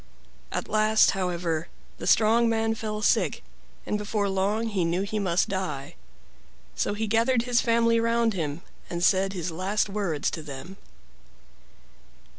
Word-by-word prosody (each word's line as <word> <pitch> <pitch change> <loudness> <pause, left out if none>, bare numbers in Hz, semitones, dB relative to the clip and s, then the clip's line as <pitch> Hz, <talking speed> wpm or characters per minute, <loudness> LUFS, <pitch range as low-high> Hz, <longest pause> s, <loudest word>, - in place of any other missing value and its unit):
At - - -3
last, 215 +1 +4
however, 175 -4 -2 0.3
the - - -5
strong 230 +2 +4
man 225 0 +1
fell 215 -1 -4
sick, - - +2 0.4
and 210 - -1
before 210 0 -1
long 205 +4 0
lie 190 - +2
knew 170 +3 0
he 215 +1 -3
must 185 -3 +1
die. 150 -8 -4 0.8
So 205 - -1
he 220 +1 -2
gathered 230 +3 +2
his 245 -1 +2
family 230 0 +3
round 230 0 +2
him 160 -3 -3 0.3
and 175 0 -3
said 190 +1 +3
his 175 -2 -3
last 195 +5 -1
words 195 -7 -1
to 160 - -5
them. 150 +6 -9
200 Hz, 145 wpm, -26 LUFS, 175-225 Hz, 0.8 s, last